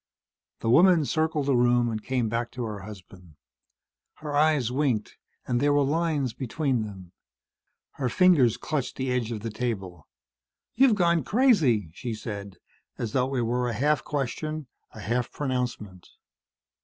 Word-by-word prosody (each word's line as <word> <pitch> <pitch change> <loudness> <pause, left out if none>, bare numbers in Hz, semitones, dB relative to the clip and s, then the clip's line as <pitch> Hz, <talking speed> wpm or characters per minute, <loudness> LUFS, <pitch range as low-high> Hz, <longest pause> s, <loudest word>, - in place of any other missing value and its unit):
The 115 - -1
woman 170 +2 +6
circled 155 -1 0
the 140 -2 +2
room 120 0 +3
and 110 -2 -3
came 125 -3 -1
back 115 +2 -2
to 125 - -4
her 105 -3 -5
husband. 95 -4 -12 0.8
Her 150 -1 -6
eyes 145 -5 +3
winked, 130 -6 -1 0.3
and 120 -1 0
there 145 +2 +2
were 145 0 +3
lines 150 -4 0
between 130 0 -1
them. 95 -5 -8 0.8
Her 130 -3 -2
fingers 150 - +4
clutched 135 -4 -3
the 130 -1 -2
edge 120 -2 -1
of 110 -3 -4
the 115 0 -4
table. 95 - -4 0.7
"You've 255 -2 +4
gone 170 -4 +2
crazy," 160 - +3
she 115 +5 -5
said, 100 -3 -7 0.4
as 115 - -3
though 130 +2 0
it 125 - +1
were 120 +1 0
a - - -3
half 145 +6 +1
question, 150 +2 -3 0.2
a - - -11
half 120 +5 -1
pronouncement. 125 -9 -4
125 Hz, 155 wpm, -26 LUFS, 110-150 Hz, 0.8 s, woman